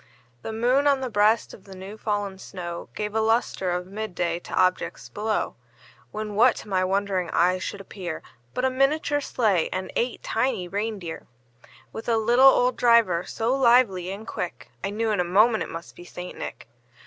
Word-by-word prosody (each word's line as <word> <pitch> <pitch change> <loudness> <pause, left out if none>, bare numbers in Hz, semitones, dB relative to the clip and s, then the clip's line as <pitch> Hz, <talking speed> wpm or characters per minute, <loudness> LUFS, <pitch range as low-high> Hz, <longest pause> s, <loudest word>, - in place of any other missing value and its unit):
The - - -5
moon, 250 +6 +2
on 275 -2 +3
the 255 -2 -3
breast 215 +2 +3
of 195 - -14
the 195 -1 -11
new 190 +3 -8
fallen 205 -3 -3
snow, 175 -3 -7
Gave 210 0 -3
a 220 - +1
lustre 220 -4 +1
of 180 0 -1
mid 200 0 -6
day 170 -1 -1
to - - -11
objects 185 0 0
below; 215 +1 -1 0.6
When, 215 - -5
what 235 +5 +5
to - - -9
my 185 -2 +1
wondering 190 -1 0
eyes 180 +2 +2
should 200 - -4
appear, 185 -4 -6 0.3
But 250 - 0
a 260 - +2
miniature 290 +2 +1
sleigh, 210 - +1
and 185 0 -3
eight 245 +1 -1
tiny 225 -6 0
rein 210 +3 -2
deer, 170 -4 -7 0.7
With 225 - -5
a 230 - +3
little 240 +4 +6
old 250 -1 +2
driver, 230 -8 +4
so 230 +4 -1
lively 235 -8 +4
and 205 +3 -7
quick, 180 -5 -6
I 195 - -1
knew 220 +2 -1
in 205 - 0
a - - +3
moment 215 +6 +4
it - - -3
must 165 +1 -8
be 175 - -11
St. 180 0 -8
Nick. - - -7
210 Hz, 195 wpm, -25 LUFS, 185-235 Hz, 0.7 s, little